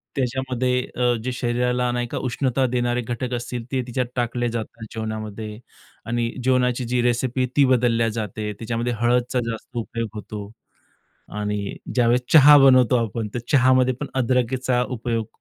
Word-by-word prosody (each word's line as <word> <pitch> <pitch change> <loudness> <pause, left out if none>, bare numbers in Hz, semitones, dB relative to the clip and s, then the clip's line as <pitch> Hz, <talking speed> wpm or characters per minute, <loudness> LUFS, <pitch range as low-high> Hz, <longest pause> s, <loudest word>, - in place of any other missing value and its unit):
त्याच्यामध्ये 130 -1 0
अ, 125 0 +2
जे 130 - -2
शरीराला, 125 0 0
नाही 120 0 -2
का, - - -5
उष्णता 130 +1 0
देणारे 120 0 0
घटक 120 +1 -4
असतील 120 0 -4
ते 130 -1 0
तिच्यात 125 +1 -1
टाकले 120 0 -1
जातात 115 0 -6
जेवणामध्ये 110 -1 -5 0.5
आणि 120 +1 -1
जेवणाची 125 -1 +1
जी 125 +1 0
रेसिपी 120 +1 0
आहे 125 - 0
ती 140 - +6
बदलल्या 120 -3 +2
जाते. 110 -1 -4
त्याच्यामध्ये 115 +3 -3
हळदीचा 125 +1 +1
जास्त 115 +2 -7
उपयोग 115 0 -3
होतो 105 -1 -7 0.9
आणि 105 -1 -3 0.2
ज्यावेळेस 120 0 +3
चहा 150 -2 +9
बनवतो 130 -2 +6
आपण 110 0 -4
तर - - -1
चहामध्ये 130 -1 +4
पण 145 - -2
अदरकीचा 125 0 +1
उपयोग 115 -3 -3
120 Hz, 150 wpm, -23 LUFS, 115-125 Hz, 0.9 s, चहा